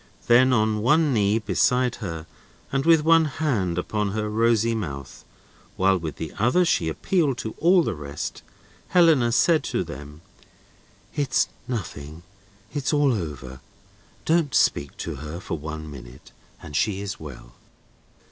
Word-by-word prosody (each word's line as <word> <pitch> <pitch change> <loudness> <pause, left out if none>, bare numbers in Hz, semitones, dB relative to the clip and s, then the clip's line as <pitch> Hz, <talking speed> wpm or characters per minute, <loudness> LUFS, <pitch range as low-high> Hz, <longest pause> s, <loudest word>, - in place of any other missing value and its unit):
Then, 130 +2 +5
on 110 -3 +1
one 150 +5 +3
knee 105 -1 +2
beside 125 +2 +1
her, 80 -6 -6 0.5
and 135 +3 -1
with 165 -2 +6
one 165 0 +5
hand 125 - -1
upon 105 +2 -2
her 105 -1 -2
rosy 115 +1 +2
mouth, 70 -11 -6 0.5
while 95 +1 +3
with 80 -4 -4
the 80 - -6
other 125 - +3
she 85 - +1
appealed 145 - 0
to 110 - -4
all 175 +1 +5
the - - -2
rest, 75 -2 -6 0.5
Helena 160 -9 +4
said 155 +5 +3
to - - -1
them: 75 +3 -10 0.9
"It's 145 -3 +1 0.2
nothing; 85 - -6 0.5
it's 145 -3 -1
all 145 -3 +3
over; 70 - -6 0.7
don't 160 -4 +1
speak 70 0 +1
to 80 -4 -5
her 75 +4 -7
for 85 -3 -5
one 80 +1 -6
minute, 65 -1 -12 0.3
and 75 - -8
she 100 +4 +1
is 100 -1 -5
well!" 65 -5 -11
105 Hz, 145 wpm, -24 LUFS, -, 0.9 s, with